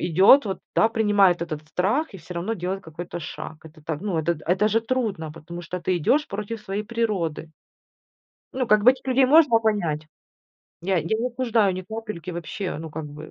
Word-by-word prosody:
идет 190 - +6
вот, 190 - -3 0.2
да, 225 - +5
принимает 205 -6 +3
этот 155 -2 -5
страх 210 - 0
и 195 - -7
всё 175 +2 -10
равно 190 +7 -2
делает 185 +1 -3
какой-то 170 +2 -7
шаг. 155 0 -7
Это 155 -1 -14
так, 150 -1 -3
ну, 200 -5 -2
это 170 +2 +1
д 150 - -14
это 185 +5 +3
же 225 +2 +2
трудно, 220 -10 -2
потому 170 +2 -9
что 175 +2 -5
ты 175 - -2
идешь 285 - +2
против 210 +2 -5
своей 200 +1 -3
природы. 205 -9 -2 1.1
Ну, 255 -2 -1
как 210 -1 +5
бы 250 - +9
этих 265 0 -11
людей 260 +1 +4
можно 280 -4 +6
понять. 170 -9 -1 0.8
Я 190 -1 +1
я - - -2
не 240 - 0
осуждаю 230 -6 +1
ни 185 - -5
капельки 210 -4 -6
вообще, 175 0 -4
ну, 160 0 -7
как 155 0 -5
бы 150 +2 -10
195 Hz, 200 wpm, -24 LUFS, 165-225 Hz, 1.1 s, бы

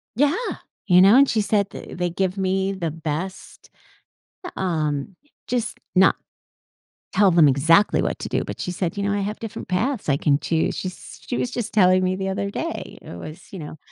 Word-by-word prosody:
Yeah! 285 +5 +3 0.5
You 180 -2 +6
know, 195 +4 +7
and 280 +1 +6
she 220 - +2
said 200 -1 +1
that, - - -9
"They 180 0 0
give 185 +2 -1
me 190 0 0
the 175 -5 -3
best" 165 +4 -6 0.8
eh, - - -4
um, 155 -2 -2 0.3
just 240 -3 -2 0.2
not 190 +1 +6 1.0
tell 195 -1 +5
them 165 -3 +6
exactly 160 +9 +4
what - - -2
to - - -5
do, - - 0
but - - -7
she 180 - -3
said, 180 0 -3
“You 200 - -1
know, 200 0 0
I 205 - 0
have 210 +2 -4
different 225 -2 -7
paths 220 - -1
I 140 - +3
can 140 -1 +2
choose,” 160 0 0
she 185 - -3
she 240 +6 -8
was 250 - -1
just 240 -3 -4
telling 185 -2 +5
me 185 0 +1
the 190 0 -3
other 195 +1 -2
day. - - -5
It - - -10
was, 155 - -10
you 190 - -6
know, 155 0 -8
190 Hz, 205 wpm, -23 LUFS, 165-205 Hz, 1.0 s, know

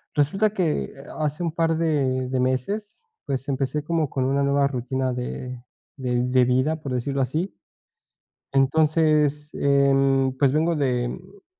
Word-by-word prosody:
resulta 195 +9 +2
que 180 -7 -1 0.3
hace 150 +3 -1
un 165 - -1
par 165 0 +1
de 135 -6 0
de 130 0 -1
meses, 200 - -2 0.2
pues, 135 0 -2
empecé 140 +2 -1
como 160 -2 0
con 130 -1 -1
una 140 +1 +1
nueva 140 0 +2
rutina 130 -1 -2
de 125 0 -5 0.3
de 125 -2 -1
de 125 0 +3
vida, 130 +6 +1
por 140 -3 -5
decirlo 135 +2 -1
así. 155 - -1 1.0
Entonces, 150 +1 +2
em, 135 -1 +3
pues, 140 -1 +3
vengo 160 +2 +1
de, 125 -4 0
mm, 190 +8 -11
140 Hz, 145 wpm, -24 LUFS, 130-155 Hz, 1.0 s, de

